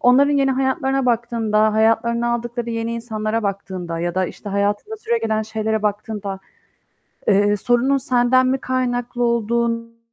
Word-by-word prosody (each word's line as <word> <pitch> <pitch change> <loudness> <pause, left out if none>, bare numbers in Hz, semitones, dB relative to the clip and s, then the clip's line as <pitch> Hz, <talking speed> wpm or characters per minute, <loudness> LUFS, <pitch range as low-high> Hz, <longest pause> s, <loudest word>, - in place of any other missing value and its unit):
onların 275 +4 +5
yeni 275 -1 +3
hayatlarına 265 0 0
baktığında, 225 -2 +1
hayatlarına 235 +2 +2
aldıkları 240 0 -4
yeni 230 0 -2
insanlara 225 -1 -2
baktığında 190 -4 -4
ya 175 0 -2
da, 185 0 +1
işte, 205 - -9
hayatında 205 - -1
süregelen 225 - -1
şeylere 220 0 -2
baktığında, 205 -2 -3 0.9
eee, 205 0 +4
sorunun 245 +6 +2
senden 255 0 +3
mi 260 +1 +1
kaynaklı 245 -1 -2
olduğun 230 0 0
230 Hz, 130 wpm, -20 LUFS, 215-245 Hz, 0.9 s, onların